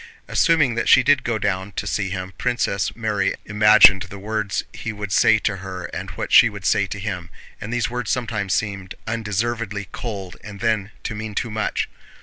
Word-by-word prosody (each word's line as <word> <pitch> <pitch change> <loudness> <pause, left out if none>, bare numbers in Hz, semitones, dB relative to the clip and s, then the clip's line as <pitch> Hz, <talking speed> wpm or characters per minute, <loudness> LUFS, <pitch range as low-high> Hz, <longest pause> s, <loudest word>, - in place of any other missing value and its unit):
Assuming 155 -7 +3
that 115 - -1
she 130 - +7
did 145 +1 +3
go 115 -2 -1
down 100 -1 -2
to 105 - -4
see 100 -1 -1
him, 95 0 -5
Princess 120 -6 -1
Mary 110 -3 0
imagined 105 -2 +6
the 100 0 -7
words 105 0 -2
he 115 - -5
would 100 -2 -6
say 110 +3 +5
to 105 -2 -1
her 95 -1 -7
and - - -5
what - - -4
she - - +8
would 100 -3 -9
say 100 +1 +2
to 100 - -5
him, 95 -4 -5 0.3
and 110 - -6
these 120 -2 0
words 125 -2 -4
sometimes 110 -6 -2
seemed 100 -3 -3
undeservedly 110 -2 -2
cold 100 -6 -6
and 105 -2 -9
then 110 -3 0
to - - -3
mean 110 -1 -6
too 115 - -2
much. 110 0 -1
105 Hz, 190 wpm, -22 LUFS, 100-115 Hz, 0.3 s, she